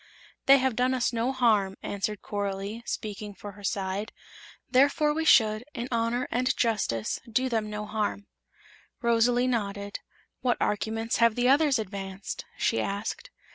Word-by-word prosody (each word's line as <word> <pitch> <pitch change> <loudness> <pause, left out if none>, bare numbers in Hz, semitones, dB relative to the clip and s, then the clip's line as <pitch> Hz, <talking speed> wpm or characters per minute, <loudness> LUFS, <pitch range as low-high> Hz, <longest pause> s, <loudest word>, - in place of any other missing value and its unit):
"They 275 +1 +9
have 260 -3 +1
done 255 +2 +2
us 245 -1 0
no 235 +3 0
harm," 215 -7 +2
answered 205 +1 -3
Coralie, 200 +1 -3
speaking 210 -1 -5
for 205 +2 -8
her 205 +1 -15
side; 195 +2 -2 0.6
"therefore 285 +3 +3
we 320 +1 -1
should, 215 -5 +5
in 240 0 -3
honor 235 +1 0
and 250 +2 +1
justice, 195 - 0
do 260 +3 +1
them 220 -3 -1
no 210 0 -4
harm." 210 -1 -2 0.8
Rosalie 235 +1 +3
nodded. 200 -4 -2 0.4
"What 250 -1 +1
arguments 225 +2 -1
have 230 -2 +4
the 245 +1 +2
others 285 -1 +4
advanced?" 195 -2 -5
she - - +1
asked. 200 +2 -4
225 Hz, 145 wpm, -28 LUFS, 205-250 Hz, 0.8 s, They